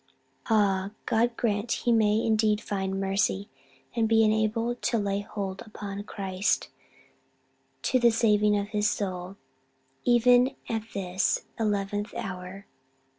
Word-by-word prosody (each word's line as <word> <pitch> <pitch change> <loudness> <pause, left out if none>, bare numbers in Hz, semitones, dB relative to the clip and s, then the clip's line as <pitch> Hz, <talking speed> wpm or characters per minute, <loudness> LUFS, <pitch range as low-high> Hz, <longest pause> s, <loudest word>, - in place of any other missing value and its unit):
"Ah, 200 -2 +2
God 235 +1 +1
grant 215 0 -1
he 240 - +4
may 220 -1 +3
indeed 215 -1 +2
find 195 -2 -3
mercy, 195 0 0 0.4
and 225 -2 +1
be 225 0 +5
enabled 220 +2 +1
to 235 - +1
lay 200 -2 0
hold 200 -1 -5
upon 205 -2 -7
Christ 195 -2 -1 1.1
to 255 - +2
the 240 -1 +6
saving 210 -2 +3
of 200 0 -3
his 210 0 +1
soul, 185 -1 -4 0.7
even 245 +2 +4
at 225 -1 -3
this 185 -1 0
eleventh 205 -1 -1
hour!" 185 +1 -6
210 Hz, 125 wpm, -27 LUFS, 195-225 Hz, 1.1 s, the